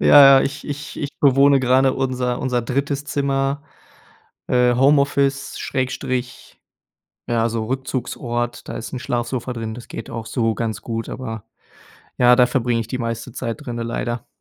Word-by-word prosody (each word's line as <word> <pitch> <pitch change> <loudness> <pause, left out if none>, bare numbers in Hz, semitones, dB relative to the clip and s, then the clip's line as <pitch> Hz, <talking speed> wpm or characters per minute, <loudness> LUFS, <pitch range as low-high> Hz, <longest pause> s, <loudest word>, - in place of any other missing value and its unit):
Ja, 140 -2 +9
ja, - - +3
ich 140 +1 -4
ich 145 0 -6
ich 145 - -3
bewohne 140 0 +5
gerade 130 +1 +3
unser 125 -2 -1
unser 125 -2 0
3. 140 +3 -2
Zimmer. 140 0 -1 0.9
Äh, 125 -1 +3
Homeoffice 140 +1 +2
Schrägstrich 130 -2 -3 0.7
ja, 115 -1 +2
so 110 -1 -2
Rückzugsort, 120 -2 -3
da - - -5
ist 115 - -6
'n 130 - -3
Schlafsofa 120 0 -2
drin. 115 -1 -4
Das 120 0 -10
geht 115 - -7
auch 115 -1 -5
so 115 -2 0
ganz 110 -2 -3
gut, 115 -1 -4
aber, 110 -4 -6 0.7
ja, 125 0 +7
da 125 -1 +6
verbringe 120 -2 0
ich 115 - -5
die 130 - -3
meiste 115 0 -4
Zeit 120 +4 -5
drinnen 120 -2 -4
leider. 120 0 -3
125 Hz, 160 wpm, -21 LUFS, 115-135 Hz, 0.9 s, Ja